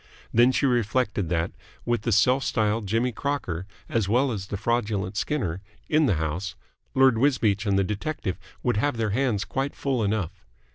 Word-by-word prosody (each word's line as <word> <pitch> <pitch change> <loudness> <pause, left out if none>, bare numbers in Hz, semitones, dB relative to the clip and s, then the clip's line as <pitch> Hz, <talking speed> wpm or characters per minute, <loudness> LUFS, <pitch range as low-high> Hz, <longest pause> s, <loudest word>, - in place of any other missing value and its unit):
Then 120 +3 +6
she 130 +2 +1
reflected 115 -6 +1
that, 85 0 0 0.3
with 120 -2 +1
the 115 - -1
self 125 +6 +4
styled 110 -1 0
Jimmy 115 +5 +1
Crocker 105 -10 -3 0.2
as 110 -4 0
well 125 +4 +3
as 95 -4 -4
the 100 - -3
fraudulent 105 -3 -1
Skinner 100 - -1 0.3
in 155 -1 +4
the 100 - +3
house, 80 +2 -3 0.4
Lord 130 -3 +5
Wisbeach 115 -6 +2
and 100 -1 +3
the 100 - +3
detective 105 - -3 0.2
would - - +1
have 130 +2 +1
their 110 -2 0
hands 115 -3 +1
quite 135 +1 -2
full 130 -5 0
enough. 100 -4 0
110 Hz, 175 wpm, -26 LUFS, 100-125 Hz, 0.4 s, Then